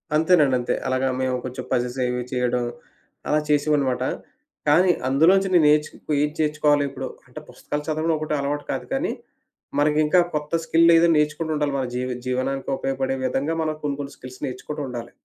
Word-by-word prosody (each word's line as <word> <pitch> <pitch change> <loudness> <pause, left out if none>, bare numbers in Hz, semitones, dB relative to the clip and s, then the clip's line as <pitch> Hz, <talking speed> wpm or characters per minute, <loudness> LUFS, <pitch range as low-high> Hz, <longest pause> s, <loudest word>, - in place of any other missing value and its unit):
అంతేనండి. 155 -4 +4
అంతే. 120 - -1
అలాగా 130 +1 +1
మేము 130 -1 0
కొంచెం 130 0 -5
పజెస్ 125 +1 -1
ఇవి 125 0 -2
చేయడం. 125 -1 0 0.6
అలా 150 - +3
చేసావాన్నమాట. 145 -4 +1 0.6
కానీ 180 +5 +5 0.2
అందులో 145 +7 +5
నుంచి 195 0 +1
నేను 170 -4 +5
నేర్చు 150 0 +3 0.3
ఏం 150 - +1
చేర్చుకోవాలి 150 -1 +2
ఇప్పుడు 135 - -6 0.2
అంటే - - -9
పుస్తకాలు 150 0 -5
చదవడం 155 +1 0
ఒకటి 155 0 -3
అలవాటు 145 +1 -2
కాదు - - -3
కానీ, - - 0 0.7
మనకి 150 +1 +3
ఇంకా 180 +4 +4 0.2
కొత్త 150 +1 -4
స్కిల్లు 165 +1 +5
ఏదో 170 +1 +5
నేర్చుకుంటూ 155 +1 0
ఉండాలి. 145 -1 0
మన 135 - -1
జీవ 125 +1 -2 0.2
జీవనానికి 135 +2 -2
ఉపయోగపడే 135 0 -2
విధంగా 140 +5 -1
మనం 155 -1 -2
కొన్ని, 145 -1 -2
కొన్ని 140 0 -7
స్కిల్స్ 130 0 -11
నేర్చుకుంటూ 145 +4 -6
ఉండాలి. 120 -1 -6
145 Hz, 170 wpm, -23 LUFS, 130-155 Hz, 0.7 s, కానీ